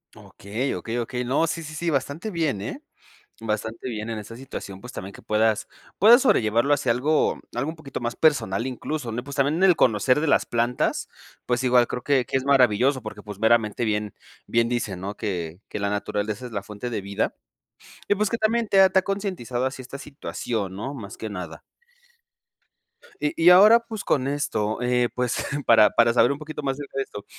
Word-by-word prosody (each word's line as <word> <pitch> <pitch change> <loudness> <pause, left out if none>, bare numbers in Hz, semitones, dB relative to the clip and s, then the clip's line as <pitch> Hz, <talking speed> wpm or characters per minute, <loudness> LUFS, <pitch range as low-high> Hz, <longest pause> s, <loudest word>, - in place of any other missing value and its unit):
Okey, 115 +7 -4
okey, 115 +1 -4
okey. 125 +1 -3
No, 135 +6 +1
sí, 165 +1 -3
sí, 155 -1 -8
sí, 170 +2 -1
bastante 145 - -2
bien, 155 - -1
¿eh? - - -6 0.6
Bastante 110 +2 -3
bien 110 -2 -5
en 110 - -4
esa 105 +2 -9
situación, 115 -6 -8
pues, 125 +4 -10
también 95 +2 -7
que - - -14
puedas, 110 0 +1 0.3
puedas 235 +5 +7
sobrellevarlo 120 - +3
hacia 135 -4 0
algo, 145 +6 +1 0.2
algo 130 +5 -1
un - - -11
poquito 145 -4 -7
más 120 0 -3
personal, 125 -8 +2
incluso, 130 0 -4
le 120 +2 -4
pues 140 0 -8
también 140 +2 +2
en 180 - 0
el 185 -3 +6
conocer 125 +2 +3
de 160 - -1
las - - +3
plantas, 120 +1 -1 0.4
pues. 120 +1 0
Igual 125 -1 +4
creo 125 - -5
que, 135 -3 +2
que 135 - 0
es 130 - -4
maravilloso, 130 -1 +3
porque, 110 -2 -8
pues, 105 -2 -9
meramente 110 0 +2
bien, 105 -2 -1 0.3
bien 115 0 +1
dicen, 110 -7 -2
¿no?, 100 +2 -5
que, 90 -5 -4
que - - -5
la 100 0 -1
naturaleza 105 +3 -3
es 125 - -8
la 100 -3 -3
fuente 105 +4 -7
de 110 - -2
vida. 100 +1 -2 0.7
Y - - +3
pues, 210 0 0
que 230 - -1
también 225 +1 +1
te 195 -1 +6
te - - +4
ha - - -17
concientizado 185 - -3
así 130 0 -4
esta 130 +2 -9
situación, 115 -8 -5
¿no? 135 +8 -5
Más 105 -7 -8
que 110 - -6
nada. 90 -4 -7 1.6
Y 150 - 0
y 165 +1 +5
ahora, 210 +6 +8
pues, 220 -3 -7
con 130 -2 +1
esto, 110 -7 -1
eh, 125 -1 +2
pues, 125 -1 -1 0.2
para, 110 -2 +7
para 115 0 +3
saber 120 +1 +4
un 140 - -3
poquito 150 -1 -7
más 135 -1 0
acerca 140 -1 -8
de 135 - +1
esto. 105 -5 -10
125 Hz, 205 wpm, -24 LUFS, 110-145 Hz, 1.6 s, ahora